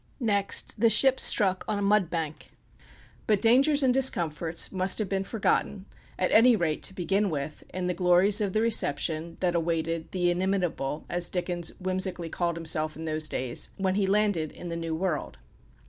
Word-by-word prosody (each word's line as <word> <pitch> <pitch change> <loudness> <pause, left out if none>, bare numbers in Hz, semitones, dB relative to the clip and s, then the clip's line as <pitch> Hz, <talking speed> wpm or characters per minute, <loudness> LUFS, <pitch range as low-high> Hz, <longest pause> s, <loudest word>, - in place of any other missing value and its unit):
Next 205 -4 0
the 230 +1 +4
ship 265 +5 +4
struck 190 -2 +3
on 215 - -1
a - - -3
mud 200 -3 +2
bank. 160 -3 -5 0.8
But 210 -2 +2
dangers 275 +6 +4
and 255 -1 +3
discomforts 170 - +1
must 190 0 +2
have 215 - -2
been 195 0 -2
forgotten, 195 -2 -1 0.3
at 185 - -1
any 240 +2 +6
rate 165 -6 -2
to 190 - -3
begin 195 +3 0
with, 150 -2 -5
in 185 0 -4
the 180 - -1
glories 185 +4 +3
of 200 -2 -2
the 215 - +1
reception 165 -6 0
that 180 -2 +1
awaited 165 -1 -2
the 175 -1 0
"inimitable," 175 -6 -2
as 175 0 -2
Dickens 175 -1 -3
whimsically 185 -2 -2
called 170 0 -2
himself 155 -2 0
in 160 - -8
those 155 -1 -1
days, 125 -2 -1
when 190 -2 0
he 195 0 0
landed 200 -6 +1
in 175 - -9
the 170 - -4
New 165 -1 -4
World. 170 - -3
185 Hz, 180 wpm, -27 LUFS, 165-205 Hz, 0.8 s, any